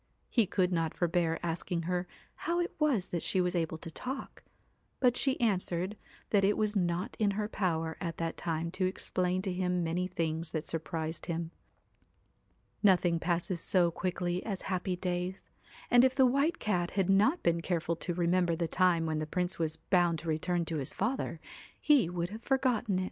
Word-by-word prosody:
He 230 -5 +3
could 185 -1 +1
not 165 -2 0
forbear 170 -1 +1
asking 170 +1 -2
her 180 +1 -1 0.3
how 345 +1 -2
it 350 - -1
was 275 - +2
that 170 - -2
she 190 - 0
was 180 -1 +1
able 165 -2 -1
to 165 - -9
talk; 260 - -6 0.6
but 250 -2 +4
she 265 0 0
answered 185 -3 0 0.4
that 200 -2 +4
it 205 +2 +3
was 215 0 0
not 175 -1 0
in 210 -2 +3
her 210 -1 0
power 165 -6 -1
at 170 -3 -3
that 165 0 -2
time 165 0 -2
to 185 0 0
explain 185 0 -1
to 190 -2 -1
him 180 -1 0
many 175 +3 -1
things 165 -2 -2
that 155 -1 -2
sur 165 - -2
prised 160 0 -5
him. 170 -1 -3 1.3
Nothing 180 -4 +4
passes 170 +1 0
so 175 -3 +3
quickly 180 0 -2
as 195 -4 -4
happy 185 0 -1
days, 180 +1 -3 0.4
and 245 0 +7
if 260 0 +3
the 265 - +6
White 280 +7 +2
Cat 180 -5 0
had 190 -2 +3
not 210 - +3
been 170 0 +2
careful 170 -1 -1
to 175 0 -2
remember 175 0 +2
the 170 0 -1
time 175 -1 +2
when 155 -1 -1
the 155 - -3
Prince 180 +3 0
was 160 -1 0
bound 175 0 +2
to 160 - -8
return 170 +2 0
to 165 -1 -3
his 135 -3 -3
father, 220 -6 -1 0.4
he 285 - +4
would 175 +1 -3
have 220 +2 -7
forgotten 245 -7 +1
it. - - +1
180 Hz, 190 wpm, -31 LUFS, 170-195 Hz, 1.3 s, and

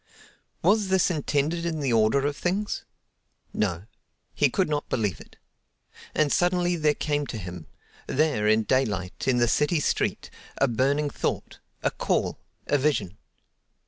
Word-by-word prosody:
Was 205 +3 +3
this 190 -1 +3
intended 155 +1 0
in 165 -2 -2
the 135 -4 0
order 115 +5 +3
of 145 0 0
things? 195 +6 -2 0.7
No, 90 -4 -1 0.5
he - - +3
could - - +1
not 150 -1 -2
believe 105 -7 -1
it. - - -16 0.8
And 150 -2 +2
suddenly 175 0 +2
there 150 -3 +2
came 145 -2 -1
to 115 - -5
him—there, 105 - -3
in 110 +1 +4
daylight, 105 -6 -1
in 130 -2 +3
the 120 0 +3
city 150 +7 +2
street—a - - -1
burning 140 +5 +1
thought, - - -3 0.2
a - - +2
call, - - -1 0.3
a 145 - +2
vision. 110 -10 0
145 Hz, 140 wpm, -26 LUFS, 110-160 Hz, 0.8 s, in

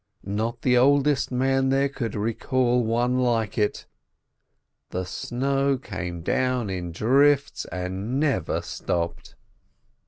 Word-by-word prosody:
Not 110 +4 -3
the 125 -1 +4
oldest 140 +1 +3
man 135 +1 +1
there 135 +1 +3
could 135 -4 -4
recall 120 +3 +1
one 120 +3 +1
like 115 -4 0
it. 105 - 0 1.0
The 90 +1 -3
snow 135 +6 0
came 95 -8 -6
down 125 -1 0
in 90 -2 -4
drifts, 140 - +2
and 95 +8 -3
never 150 -3 0
stopped. 85 -1 -3
125 Hz, 115 wpm, -25 LUFS, 105-135 Hz, 1.0 s, the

